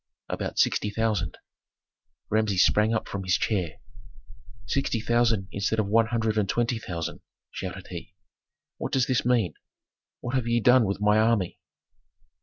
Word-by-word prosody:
"About - - -4
sixty 105 - +2
thousand." 105 -6 -1 0.9
Rameses 105 -3 +3
sprang 105 +1 +3
up 110 - -1
from 100 -1 -4
his 90 -1 +2
chair. 90 -8 -1 0.9
"Sixty 130 0 0
thousand 115 -3 +2
instead 100 +3 -1
of 110 - +2
one 110 +3 +3
hundred 110 -2 0
and 100 -2 0
twenty 120 -1 0
thousand!" 85 -5 -5 0.3
shouted - - -6
he. - - -8 0.6
"What - - -5
does 130 -1 +3
this 130 -2 +1
mean? 115 -10 +2 0.7
What 120 - -5
have 130 -3 0
ye 120 0 +2
done 125 +1 +5
with 100 0 -2
my 105 +1 +4
army?" 110 -5 +1
110 Hz, 150 wpm, -26 LUFS, 100-115 Hz, 0.9 s, done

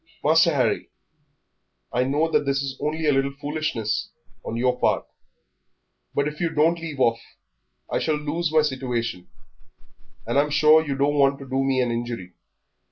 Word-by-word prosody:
"Master - - +5
Harry, - - 0 1.0
I 125 +1 +2
know 145 +5 +1
that - - +3
this 140 0 0
is 135 -1 -4
only 155 +1 -2
a 150 - +4
little 135 0 0
foolishness 145 -8 -2 0.3
on 115 - -4
your 125 +1 +1
part, - - +1 1.1
but 140 0 +1
if 150 +2 -6
you 170 - +1
don't 165 +2 +2
leave 160 -4 -6
off 115 -2 +3 0.7
I - - -1
shall 155 -1 0
lose 150 +2 -2
my 155 -1 +4
situation, 120 -9 -3 1.0
and 120 +5 +1
I'm 150 +1 +2
sure 155 +2 +5
you 140 -3 -3
don't 145 +2 +1
want 140 0 +4
to 135 - -10
do 135 +1 0
me 135 -1 +1
an 120 -1 0
injury." 115 -6 -4
140 Hz, 165 wpm, -24 LUFS, 125-150 Hz, 1.1 s, Master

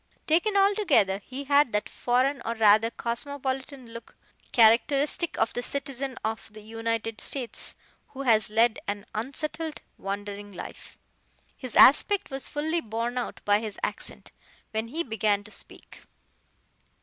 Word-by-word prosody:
Taken 355 +6 +2
altogether 390 - +3
he 260 +6 -7
had 280 -3 +3
that 210 - 0
foreign 255 +3 0
or 230 +1 -2
rather 220 0 +5
cosmopolitan 265 +2 -4
look 230 0 -11 0.4
characteristic 275 +8 +3
of 225 - +1
the 245 - -2
citizen 275 -1 -4
of 220 0 -4
the 215 0 -12
United 225 0 -3
States 255 -4 -1 0.3
who 275 0 -7
has 220 -5 +4
led 225 +1 +3
an 205 0 -3
unsettled, 305 +7 -3 0.2
wandering 205 +1 -5
life. 180 - -10 0.6
His 255 -4 -7
aspect 335 +7 +6
was 270 0 -3
fully 315 +3 -1
borne 230 +1 -3
out 245 - -5
by 205 0 +4
his 215 -2 -6
accent, - - -4 0.4
when 220 +1 -2
he 320 +8 -2
began 215 - 0
to 210 - -12
speak. - - -8
235 Hz, 135 wpm, -27 LUFS, 220-280 Hz, 0.6 s, aspect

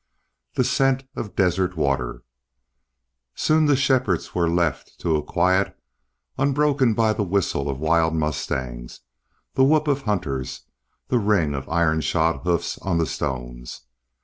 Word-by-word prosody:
THE 130 - +3
SCENT 135 +1 +2
OF 105 - -6
DESERT 90 -1 +1
WATER 65 -5 -1 1.1
SOON 155 0 +3
the 145 - +4
shepherds 130 -8 +1
were 85 -2 +1
left 85 -4 -1
to 80 -2 +1
a 75 - +1
quiet 95 +5 +1 0.6
unbroken 140 -3 +2
by 110 -1 +3
the 105 - -2
whistle 90 -7 0
of 70 - -2
wild 80 +2 +2
mustangs, 65 -6 -3 0.5
the 130 - +3
whoop 155 +2 +3
of 140 -1 +1
hunters, 80 - -3 0.5
the 125 - +2
ring 100 -9 +2
of 70 -1 -5
iron 80 -1 +2
shod 80 +3 +1
hoofs 85 0 -1
on 95 -3 -1
the 85 - +2
stones. - - -5
85 Hz, 140 wpm, -23 LUFS, 75-120 Hz, 1.1 s, the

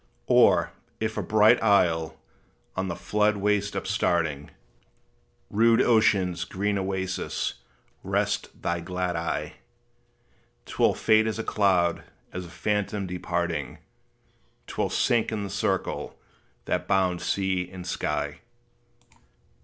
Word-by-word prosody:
Or, - - +4 0.3
if 110 0 -2
a 105 - -1
bright 105 +3 +4
isle, 85 -7 +2 0.6
on 95 0 -1
the 85 - -3
flood 105 +2 +1
waste 100 0 0
upstarting, 80 -4 0 1.0
Rude 115 +2 +4
ocean's 100 -6 +3
green 100 +1 -1
oasis, 95 -1 -2 0.5
rest - - -1
thy 85 0 0
glad 90 +1 -3
eye, 85 0 -3 1.1
'T - - -10
will - - +4
fade 110 0 +3
as 110 - -2
a 115 - -3
cloud 95 -6 +2 0.3
as 90 -1 -5
a - - -13
phantom 105 +1 -2
departing, 85 -5 -3 0.9
'T - - -10
will - - +1
sink 115 -2 +1
in 105 -2 -2
the 100 - -5
circle - - -2 0.5
that - - -1
bounds 90 -2 +1
sea 95 -2 -1
and 90 -2 -8
sky. 90 - -2
95 Hz, 120 wpm, -26 LUFS, 90-105 Hz, 1.1 s, Or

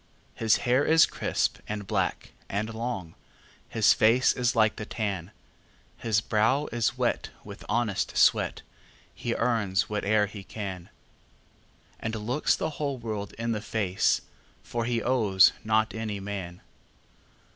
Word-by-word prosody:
His 110 -2 +3
hair 125 +3 +3
is 160 +1 +6
crisp, - - -1
and 105 -1 -4
black, - - -2 0.2
and 110 +3 -2
long, 110 -8 -4 0.6
His 110 -2 +4
face 115 +4 +4
is 125 -1 0
like 110 -1 +3
the - - -4
tan; 100 -5 -3 0.7
His 110 -2 0
brow 110 +8 +2
is 115 -1 0
wet - - 0
with - - -10
honest 110 -2 0
sweat, - - +3 0.5
He 120 - -3
earns 110 -5 +1
whate'er 105 0 +2
he 105 -1 -9
can, 95 -4 -6 1.1
And 110 0 -3
looks 120 +7 +1
the 160 - -2
whole 140 -2 -1
world 110 -4 -5
in 115 +1 -3
the 105 -2 -2
face, 100 -4 +1 0.4
For 120 -1 -3
he 120 -1 -1
owes 105 -7 +5
not 110 +1 +1
any 110 -2 -4
man. 95 -3 -6
110 Hz, 135 wpm, -27 LUFS, 100-120 Hz, 1.1 s, is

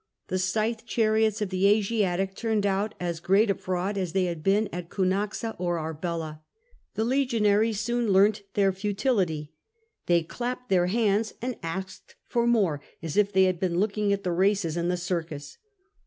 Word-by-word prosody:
The 185 - 0
scythe 220 +5 0
chariots 220 -2 +2
of 200 - -3
the 185 +1 +3
Asiatic 195 -3 +1
turned 220 0 -1
out 200 +2 0
as 170 -2 -3
great 195 +5 +3
a - - +3
fraud 185 +2 -2
as 180 -3 -3
they 190 -1 +2
had 170 -3 -3
been 200 +5 +2
at 175 -1 -5
Ounaxa 200 +4 -1
or 175 -1 0
Arbela. 160 -1 -4 0.5
The 220 - 0
legionaries 225 -5 +2
soon 240 -1 0
learnt 200 +2 +4
their 195 -1 +3
futility; 190 - -1 0.5
they 170 -1 +3
clapped 250 +7 -5
their 180 -2 +3
hands 215 +1 +1
and 250 0 -3
asked 190 +4 -6
for 235 0 0
more, 195 -11 +2 0.2
as 160 -2 -4
if 205 -1 +3
they 190 -1 +4
had 185 -2 +1
been 175 -2 0
looking 210 0 +1
at 200 0 0
the 180 - -1
races 190 -2 +1
in 170 0 -1
the 180 - 0
circus." 165 -5 -4
195 Hz, 170 wpm, -27 LUFS, 175-215 Hz, 0.5 s, learnt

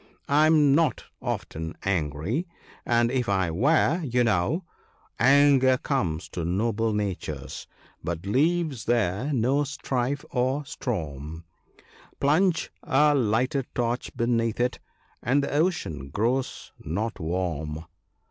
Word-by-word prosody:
I 150 +2 +4
am 150 -3 +5
not 155 -1 +2 0.2
often 80 +1 -4
angry, 95 - -1 0.4
and 120 0 +3
if 125 -3 0
I 95 -4 +1
were, 155 - +2
you 125 -3 +1
know 110 - +1 0.2
— - - -36
" - - -35
Anger 135 0 +5
comes 85 - -2
to 85 - -4
noble 110 +6 0
natures, 95 -9 -4 0.4
but 85 +1 -4
leaves 145 - +1
there 115 +3 +1
no 135 +3 +2
strife 135 -1 -2
or 130 +3 0
storm: 80 - -5 0.8
Plunge 165 +5 +2
a 150 0 +3
lighted 125 +1 +1
torch 120 0 -1
beneath 115 -1 0
it, 125 +1 0 0.4
and 135 +4 +2
the - - -3
ocean 145 - -1
grows 120 - -1
not 105 +8 -3
warm." 80 -2 -3
120 Hz, 120 wpm, -26 LUFS, 90-140 Hz, 0.8 s, am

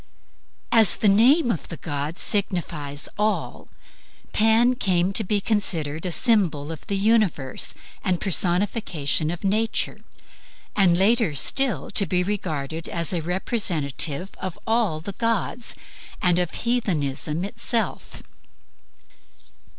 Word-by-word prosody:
As 225 -4 +6
the 215 - +1
name 240 +7 +5
of 170 - -4
the 165 - -8
god 145 +1 -4
signifies 170 -8 -1
ALL, 215 0 -2 0.6
Pan 225 +3 +4
came 190 -6 +1
to 220 - +1
be 205 +1 0
considered 180 -7 0
a - - -3
symbol 170 - +2
of 160 - -9
the 200 -2 -1
universe 200 - 0 0.3
and 185 -4 0
personification 175 -4 0
of 175 +2 -5
Nature; 215 +3 0 0.8
and 180 -4 +4
later 205 - +2
still 230 - 0
to 200 - +2
be 180 -1 +1
regarded 165 -6 -4
as 170 +1 0
a 170 - -1
representative 170 - -1
of 185 -2 -5
all 220 -9 0
the 200 - -5
gods 230 +2 -1 0.4
and 180 -2 +2
of 175 -2 0 0.2
heathenism 165 - 0
itself. 230 +2 -2
185 Hz, 120 wpm, -23 LUFS, 160-220 Hz, 0.8 s, As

